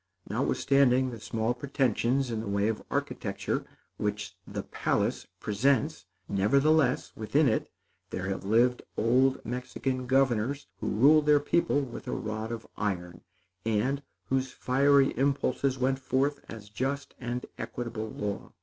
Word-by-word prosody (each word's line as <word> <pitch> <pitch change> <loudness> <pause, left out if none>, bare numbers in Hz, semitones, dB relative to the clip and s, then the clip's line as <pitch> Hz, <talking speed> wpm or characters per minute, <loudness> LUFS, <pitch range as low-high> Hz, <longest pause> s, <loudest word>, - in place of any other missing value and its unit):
Notwithstanding 130 -2 +2
the 115 - -7
small 115 +2 -1
pretensions 130 -1 0
in 115 - -2
the 110 - -5
way 100 +1 +1
of 110 - -2
architecture - - -2 0.3
which 105 0 -3
the - - -4
Palace - - -1
presents, 135 - +1 0.2
nevertheless, 140 +7 +3
within 140 +7 +2
it, 110 - 0 0.4
there 95 - -4
have 95 -1 -3
lived 120 +5 +3 0.2
old 130 +4 +3
Mexican 125 +1 -3
governors 130 0 +2
who - - -3
ruled 150 +7 +5
their 150 -1 +6
people 145 0 +2
with 125 -4 -7
a - - -2
rod 110 +1 -3
of 115 -1 -5
iron, 90 -4 -3 0.4
and 115 +6 0 0.2
whose 130 -1 0
fiery 140 +1 +3
impulses 135 -1 +1
went 130 +1 +1
forth 135 +2 0
as 110 -2 -9
just 135 +6 -3
and 125 0 -3
equitable 115 -2 -4
law. 100 -2 -5
125 Hz, 135 wpm, -29 LUFS, 110-135 Hz, 0.4 s, their